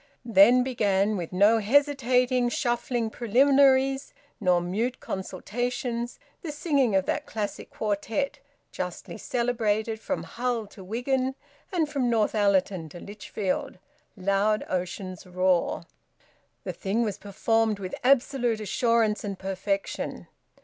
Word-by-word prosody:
Then 235 +3 +6
began, 210 -5 +1
with 175 -4 -4
no 205 +5 +4
hesitating 250 0 +2
shuffling 240 -1 -1
preliminaries 270 +3 +3 0.2
nor 180 -4 +3
mute 210 +9 -2
consultations, 240 +5 -3 0.2
the 330 - -5
singing 285 - +1
of 190 -1 +2
that - - -2
classic 210 -2 -4
quartet, 220 +6 -2 0.3
justly 180 +4 -6
celebrated 225 -3 0
from 280 +5 -3
Hull 240 -2 -2
to 200 -1 -13
Wigan 255 +6 -1 0.4
and 335 -5 +1
from 275 -4 0
Northallerton 200 -6 +1
to 175 - -10
Lichfield, 210 +5 -4 0.4
"Loud 200 +3 +1
Ocean's 185 0 -4
Roar." 180 -1 +1 0.8
The - - -4
thing 215 +4 -1
was 210 -3 -3
performed 220 +2 +1
with 185 -2 -6
absolute 250 -3 +2
assurance 220 +1 +1
and 200 -2 -4
perfection. 195 +1 -3
225 Hz, 115 wpm, -27 LUFS, 195-250 Hz, 0.8 s, Then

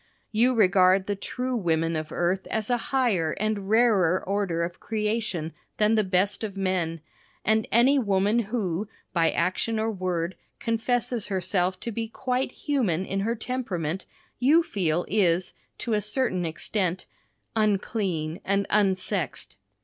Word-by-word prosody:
You 245 +4 +3
regard 185 -2 +5
the 205 - -1
true 250 +5 -3
women 165 -5 +1
of 155 0 -4
earth 180 +2 0
as 220 +2 -2
a 245 - +3
higher 215 - +2
and 210 -2 -2
rarer 210 -6 +4
order 195 -4 0
of 170 +1 -5
creation 210 -7 -2 0.2
than 215 +1 +3
the 215 -1 +3
best 195 +3 +1
of 200 -3 -4
men, 180 -4 -1 0.4
and 220 +1 +2
any 260 +5 +5
woman 205 0 +2
who 210 -4 -2 0.2
by 165 -2 +3
action 185 +6 0
or 220 +1 0
word 185 -3 -2 0.2
confesses 235 0 0
herself 185 -1 0
to 235 - -3
be 225 +1 -3
quite 255 +3 -2
human 215 - 0
in 195 +1 -2
her 225 +4 0
temperament, 195 -9 -3 0.3
you 300 +7 +5
feel 175 - 0
is, 185 -4 +2 0.2
to 230 - -2
a 210 - +2
certain 210 -4 0
extent, 180 +2 -2 0.5
"unclean 195 -6 0
and 200 0 +1
unsexed." 190 - 0
200 Hz, 140 wpm, -26 LUFS, 180-225 Hz, 0.5 s, regard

